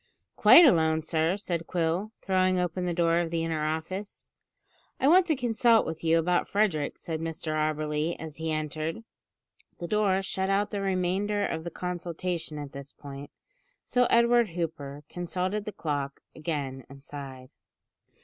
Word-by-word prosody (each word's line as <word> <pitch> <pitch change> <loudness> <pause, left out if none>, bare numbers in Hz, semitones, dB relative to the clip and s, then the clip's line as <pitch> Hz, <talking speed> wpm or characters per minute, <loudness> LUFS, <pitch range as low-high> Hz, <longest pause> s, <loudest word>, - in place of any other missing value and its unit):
"Quite 345 - +9
alone, 160 - +4
sir," 160 +3 +1
said 170 -5 -3
Quill, 175 +4 -1
throwing 185 -1 +2
open 180 0 -1
the - - 0
door 170 -1 +3
of 170 -1 -1
the 165 0 -1
inner 160 -2 -1
office. 160 +6 -4 0.7
"I 265 - +2
want 360 +4 +6
to 315 - +2
consult 235 -2 +3
with 160 0 -5
you 165 0 +4
about 175 +2 +1
Frederick," 190 -9 0
said 160 -1 -5
Mr 160 -1 -4
Auberly 155 +1 -1
as 160 -2 -8
he 160 0 -2
entered. 155 +6 -3 0.7
The 175 - -5
door 195 -1 +2
shut 190 0 -2
out 200 +1 +1
the 205 -2 -2
remainder 195 +2 0
of 160 0 -3
the 170 - -4
consultation 175 -2 -4
at 145 -2 -6
this 140 0 -9
point, 140 0 -9 0.6
so 250 0 +2
Edward 235 -1 +4
Hooper 145 -4 -4
consulted 185 +5 -3
the 210 - -4
clock 145 -6 -3
again 145 -5 -4
and 135 0 -13
sighed. 135 -3 -9
170 Hz, 160 wpm, -28 LUFS, 155-195 Hz, 0.7 s, Quite